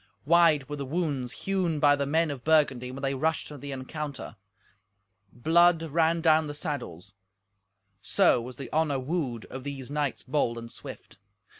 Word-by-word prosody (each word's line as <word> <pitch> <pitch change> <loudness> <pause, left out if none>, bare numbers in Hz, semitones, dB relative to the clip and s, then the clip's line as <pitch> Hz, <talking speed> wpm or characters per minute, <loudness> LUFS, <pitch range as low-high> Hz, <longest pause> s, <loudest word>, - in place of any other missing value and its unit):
Wide 160 -3 +4
were 145 - -5
the 140 - -4
wounds 145 -6 -2
hewn 185 -5 0
by 145 -1 +5
the 140 -1 -2
men 160 +1 +1
of 130 -4 -7
Burgundy 145 -6 +2
when 135 +2 -8
they 135 0 0
rushed 155 +4 -1
to 150 - -9
the 140 +2 -7
encounter. 135 -1 -6 1.0
Blood 165 +6 +4
ran 165 +1 +1
down 160 -1 +4
the 145 - -6
saddles. 105 - -6 0.9
So 180 - +3
was 125 +2 -8
the 135 - -9
honour 155 -3 +1
wooed 130 -4 -3
of 130 0 -7
these 140 -2 -6
knights 145 -2 -2
bold 130 -3 0
and 115 0 -8
swift. - - -11
145 Hz, 165 wpm, -27 LUFS, 130-160 Hz, 1.0 s, by